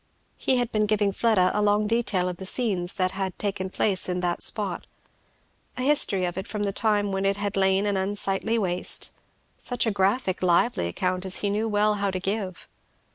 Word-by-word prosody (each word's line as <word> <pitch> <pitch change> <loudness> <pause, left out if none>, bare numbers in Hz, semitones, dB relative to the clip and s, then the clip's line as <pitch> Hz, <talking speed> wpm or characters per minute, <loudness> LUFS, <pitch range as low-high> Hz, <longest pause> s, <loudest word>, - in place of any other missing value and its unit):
He 260 - +1
had 245 -1 -1
been 215 -1 +1
giving 205 -1 +2
Fleda 195 -4 +2
a 210 - 0
long 210 0 +2
detail 210 -5 +1
of 180 -1 -4
the 190 - -7
scenes 190 -7 -1
that 185 -1 +1
had 190 -1 -4
taken 195 -2 -2
place 190 -1 +1
in 180 0 -1
that 175 -1 -1
spot 200 -5 -1 0.9
a 255 - -2
history 260 -10 +3
of 175 +1 -3
it 190 - -6
from 210 -1 -3
the 200 - 0
time 205 -2 +1
when 195 0 -1
it 195 0 +1
had 205 0 -3
lain 190 +1 +2
an 205 -1 0
unsightly 195 +3 0
waste; 180 -4 -1 0.5
such 245 -1 0
a 225 - +1
graphic 195 +1 0
lively 180 - +2
account 185 - -2
as 190 -1 -2
he 205 - 0
knew 215 +2 0
well 210 0 +3
how 200 - +1
to 185 -1 -3
give. 195 -1 -3
200 Hz, 200 wpm, -25 LUFS, 185-210 Hz, 0.9 s, history